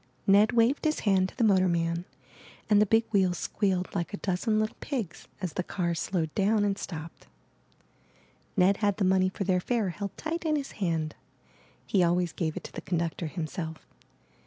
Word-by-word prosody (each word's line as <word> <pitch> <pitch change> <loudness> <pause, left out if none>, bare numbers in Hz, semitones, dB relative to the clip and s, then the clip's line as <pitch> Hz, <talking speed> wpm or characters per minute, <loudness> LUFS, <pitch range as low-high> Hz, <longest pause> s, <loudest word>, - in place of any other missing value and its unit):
Ned 205 +3 +5
waved 235 +4 +3
his 310 0 +1
hand 190 -3 +3
to - - -18
the 245 - +2
motorman 175 -4 +2 0.7
and 205 0 +6
the 210 - +4
big 225 +3 +3
wheels 190 -4 +2
squealed 190 -3 -1
like 175 +2 -2
a - - -7
dozen 205 +4 0
little 215 0 -1
pigs 235 - -4
as 185 -4 -3
the - - -1
car 175 -2 -1
slowed 165 -1 -2
down 205 +1 +2
and 200 -1 +1
stopped. 165 -4 -8 1.3
Ned 195 +2 +4
had 205 -2 +1
the 200 - +1
money 185 0 +3
for 195 - -4
their 185 -1 +2
fare 220 +1 0
held 200 +2 -5
tight 325 +2 -3
in 310 -2 +1
his 280 -2 -3
hand 165 -6 -1 0.4
— - - -31
he 195 - +2
always 175 0 +2
gave 160 -2 -2
it - - -5
to - - -9
the - - -6
conductor 170 -1 -2
himself. 160 0 -5
190 Hz, 185 wpm, -28 LUFS, 170-210 Hz, 1.3 s, and